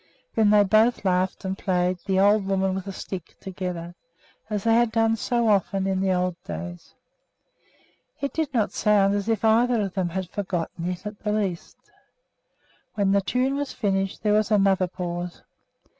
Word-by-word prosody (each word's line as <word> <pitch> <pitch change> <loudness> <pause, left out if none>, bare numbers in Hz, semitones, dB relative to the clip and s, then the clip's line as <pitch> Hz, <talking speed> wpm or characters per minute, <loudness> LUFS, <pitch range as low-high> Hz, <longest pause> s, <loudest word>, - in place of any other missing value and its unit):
Then 220 -2 +3
they 210 0 +6
both 215 +3 +3
laughed 185 +1 0
and 190 0 -2
played 180 -2 0
"The 190 -1 +2
Old 200 0 +4
Woman 190 -1 +1
with 190 +1 -5
a - - -3
Stick" 185 -2 -7
together, 180 -2 -5 0.6
as 210 -2 -2
they 225 - +3
had 235 0 +4 0.3
so 235 0 0
often 195 -2 +2
done 195 - 0
in 190 - -1
the 190 -1 +1
old 180 -1 -1
days. 85 +1 -8 1.2
It 280 0 -3
did 315 -3 -1
not 225 -6 +1
sound 200 -2 +3
as 205 +1 -2
if 225 -1 0
either 235 +2 +4
of 195 -3 -2
them 185 -3 -1
had 185 +1 -3
forgotten 175 -3 -3
it 180 +2 -6
in 210 0 -6
the 210 - 0
least. 200 -5 -2 1.2
When 200 -2 +2
the 200 0 +3
tune 255 +7 0
was 285 -1 -3
finished 195 -4 -1
there 210 -1 +3
was 215 -1 +2
another 195 -3 +3
pause. 175 -1 -5
195 Hz, 175 wpm, -25 LUFS, 185-215 Hz, 1.2 s, they